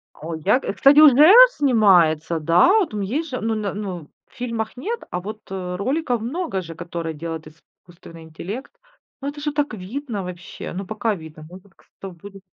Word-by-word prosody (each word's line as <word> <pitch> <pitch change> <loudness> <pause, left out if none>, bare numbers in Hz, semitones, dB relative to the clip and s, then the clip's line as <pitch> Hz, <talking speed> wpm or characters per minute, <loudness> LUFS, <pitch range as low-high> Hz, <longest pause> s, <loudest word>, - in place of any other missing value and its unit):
О, 160 +2 -6
я 190 +10 +2
и, - - -4
кстати, 280 +2 +5
уже 300 +4 +8 0.2
снимается, 175 - +3
да. 165 - +4
Вот 370 - 0
там 210 -1 -4
есть 285 +11 -3
же, 255 - -5
ну, 225 0 -1
на, 210 -2 -3
ну, 185 -7 -6 0.2
в - - -30
фильмах 230 -3 -4
нет, 455 - -4
а 180 - -3
вот, 215 +2 -8
э, 180 -2 -4
роликов 250 - -1
много 270 - -3
же, 165 -2 -10
которые 170 -1 -5
делает 160 0 -7
искусственный 165 +1 -16
интеллект. 180 - -8 0.5
Ну, 280 - -4
это 290 0 -9
же 295 0 -2
так 290 -4 -2
видно 215 +2 -5
вообще, 180 -1 -8
ну, 190 +1 -5
пока 215 +1 -2
видно. 160 -2 -12
Ну, 180 - -11
это 195 +2 -20
к 190 - -28
сто 195 - -8
будет. 195 +3 -13
200 Hz, 195 wpm, -21 LUFS, 170-250 Hz, 0.5 s, уже